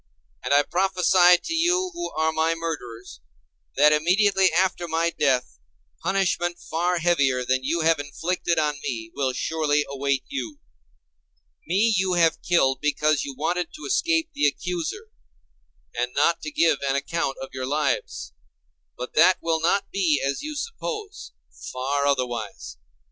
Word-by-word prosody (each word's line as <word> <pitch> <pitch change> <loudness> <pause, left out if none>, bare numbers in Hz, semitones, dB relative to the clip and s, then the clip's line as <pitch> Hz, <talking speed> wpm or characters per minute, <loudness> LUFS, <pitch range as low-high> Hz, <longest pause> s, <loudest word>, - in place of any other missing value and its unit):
And 125 - -3
I 145 +1 +5
prophesy 180 0 +4
to 330 - -4
you 360 +3 +1
who 345 0 -4
are 160 0 +1
my 160 +1 +1
murderers, 125 - -6 0.6
that 150 +1 +5
immediately 190 +4 +3
after 175 0 0
my 165 +1 0
death 135 -6 0 0.4
punishment 175 -3 0
far 175 +1 -1
heavier 140 -7 +1
than 130 +1 0
you 165 +5 0
have 160 -1 +3
inflicted 170 +4 -2
on 150 -2 0
me 115 -3 -5
will 135 -2 -1
surely 150 +2 0
await 140 -1 -1
you. 290 +2 -5 1.1
Me 220 +4 +2
you 190 -1 +1
have 165 -2 +2
killed 135 -7 +2
because 150 0 +1
you 140 - -6
wanted 175 +3 -1
to 305 - -9
escape 330 -4 +1
the 145 - +2
accuser, 180 - -4 0.8
and 125 +1 -2
not 170 - +2
to 155 - -5
give 160 -2 +2
an 135 - +1
account 140 0 -2
of 135 - -7
your 130 0 -4
lives. 145 - -2 0.6
But 125 - -6
that 175 +4 +5
will 165 -1 -1
not 195 +4 +1
be 170 -7 +1
as 140 0 -2
you 305 0 -6
suppose: 430 +2 -6 0.4
far 140 +2 -1
otherwise. 120 -7 -3
160 Hz, 150 wpm, -24 LUFS, 140-185 Hz, 1.1 s, I